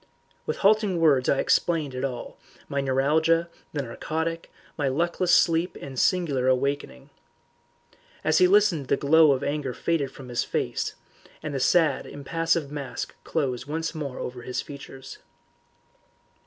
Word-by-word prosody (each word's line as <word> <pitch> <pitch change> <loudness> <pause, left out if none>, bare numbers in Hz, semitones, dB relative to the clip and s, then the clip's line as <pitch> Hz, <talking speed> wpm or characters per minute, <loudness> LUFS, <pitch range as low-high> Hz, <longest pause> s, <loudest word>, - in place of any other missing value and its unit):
With - - -2
halting 200 -3 +3
words 145 -6 +4
I 140 - +3
explained 155 -4 +1
it 130 +1 -4
all, 130 -3 -5 0.3
my 140 0 -1
neuralgia, 155 +5 +2 0.2
the 145 -2 -2
narcotic, 160 +7 -4 0.2
my 145 -3 -1
luckless 170 +5 0
sleep 170 +1 +3
and 135 -2 -6
singular 150 -9 +1
awakening. 130 - -1 1.1
As 155 0 +3
he 180 - +6
listened 190 -8 +3
the - - +2
glow 155 +1 +5
of 135 0 0
anger 140 -3 -2
faded 160 -5 0
from 135 -2 -12
his 120 -1 0
face, - - -2 0.5
and 150 -2 -4
the 135 - -1
sad, 160 +4 +2
impassive 165 +1 -1
mask 140 -3 -5
closed 130 -5 -2
once 160 +2 -3
more 145 -5 -5
over 125 0 -6
his 125 +1 -4
features. 135 -2 -9
145 Hz, 140 wpm, -26 LUFS, 135-165 Hz, 1.1 s, he